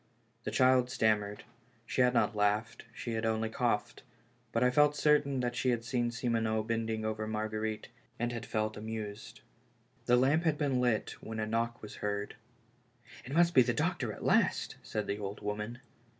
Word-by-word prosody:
The - - -1
child 130 -1 +4
stammered; 105 -3 +1 0.4
she 130 - 0
had 125 0 +4
not 115 - +2
laughed, 105 +3 0
she 120 - -6
had 110 0 -2
only 110 0 0
coughed; 110 -3 -1 0.5
but 115 - +1
I 125 - +4
felt 150 +2 +4
certain 145 -3 +3
that 120 0 -1
she 130 - +1
had 115 -2 0
seen 120 +1 0
Simoneau 115 -2 0
bending 110 -1 -2
over 110 0 -2
Marguerite, 110 0 -3 0.3
and 120 +1 -1
had 120 -1 -5
felt 110 0 -2
amused. 110 -1 -6 0.7
The 125 - +5
lamp 140 +6 +3
had 160 -3 +2
been 135 -4 +1
lit, 120 -4 +1
when 110 0 -6
a 110 - 0
knock 115 +2 -2
was 105 - -9
heard. 100 0 -3 0.9
"It 130 - -6
must 170 0 +4
be 130 - +8
the 120 - +1
doctor - - 0
at - - -9
last," - - +2
said 105 - -3
the 100 - -3
old 100 0 -5
woman. 105 +4 -4
115 Hz, 180 wpm, -32 LUFS, 110-125 Hz, 0.9 s, be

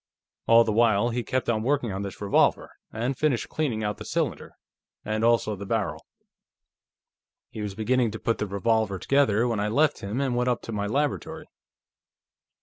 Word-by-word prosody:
All 115 0 +7
the 110 - -1
while, 115 0 +3
he 120 +1 -2
kept 130 +2 -2
on 110 -2 +1
working 125 -2 0
on 95 +1 -4
this 100 -1 -6
revolver, 100 -1 +2 0.2
and 120 +5 -2
finished 140 -4 0
cleaning 125 -9 -2
out 105 -1 -2
the - - -8
cylinder, - - -3 0.5
and 110 +1 -1
also 115 -2 +2
the 100 - -8
barrel. - - -2 1.4
He 110 - -6
was 100 -2 -4
beginning 120 +2 +1
to 110 +1 -7
put 115 - -1
the 105 - -1
revolver 100 0 0
together 120 -1 +2
when 115 -3 -1
I 105 - 0
left 145 +7 +2
him 100 +6 -4
and 135 -3 0
went 125 +1 +1
up 120 - -1
to - - -7
my 105 -1 -2
laboratory. 145 +6 -2
115 Hz, 180 wpm, -26 LUFS, 105-125 Hz, 1.4 s, All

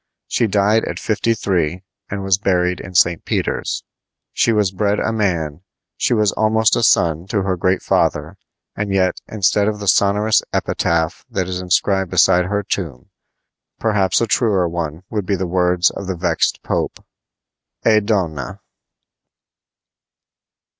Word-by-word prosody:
She 115 - 0
died 105 +2 +2
at - - -4
fifty 115 +1 0
three, 90 -4 -1 0.3
and 100 0 -4
was 95 -1 +2
buried 90 -3 +1
in 95 -1 -10
St. 85 -1 +3
Peter's. - - -2 0.5
She 115 - +2
was 105 -4 +1
bred 100 +2 0
a 115 - -1
man, 85 -8 -1 0.3
she 120 - +1
was 105 -3 +2
almost 110 +1 +2
a - - 0
son 85 -5 +2
to 100 -1 -1
her 95 -1 0
great 90 +1 0
father; - - 0 0.4
and 100 -1 -3
yet, 95 -1 +1
instead 105 0 +1
of 105 -1 -1
the 100 -1 -7
sonorous 105 +3 +3
epitaph 80 -1 -1
that 95 -2 -2
is 90 0 -4
inscribed 95 +1 +1
beside 90 0 +4
her 100 +2 -1
tomb, 85 - -5 0.7
perhaps 105 -4 +1
a - - +3
truer 105 -6 +1
one 85 -1 -4
would 105 -4 -3
be 100 - +1
the 95 0 -2
words 90 0 +2
of 100 - -7
the 95 - -2
vexed 90 +1 0
Pope: - - -3 0.8
"E 110 -1 +5
DONNA!" 90 - -2
95 Hz, 150 wpm, -19 LUFS, 90-105 Hz, 0.8 s, E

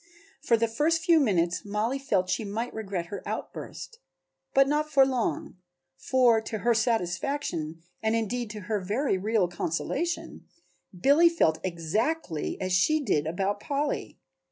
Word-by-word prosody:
For 235 -5 +3
the 230 +1 +1
first 315 +8 +1
few 330 -1 +5
minutes 175 - +1
Mollie 215 +6 -1
felt 195 -9 0
she 220 - -1
might 220 +4 -4
regret 195 -5 -4
her 200 - -4
outburst, 460 - -7 0.5
but 275 0 +5
not 300 +1 0
for 275 -3 +5
long, 250 -7 -2 0.4
for 240 - +3
to 220 0 -4
her 240 - +5
satisfaction 180 - -1 0.2
and 220 +1 +1
indeed 230 +1 -2
to 210 0 -7
her 205 +2 -2
very 205 +3 0
real 210 -1 +1
consolation, 175 - -3 0.5
Billy 290 - +6
felt 160 - +2
exactly 175 - -2
as 185 -1 -2
she 310 +13 +3
did 155 - 0
about 195 +5 -1
Polly. 285 +5 -2
220 Hz, 145 wpm, -27 LUFS, 185-275 Hz, 0.5 s, Billy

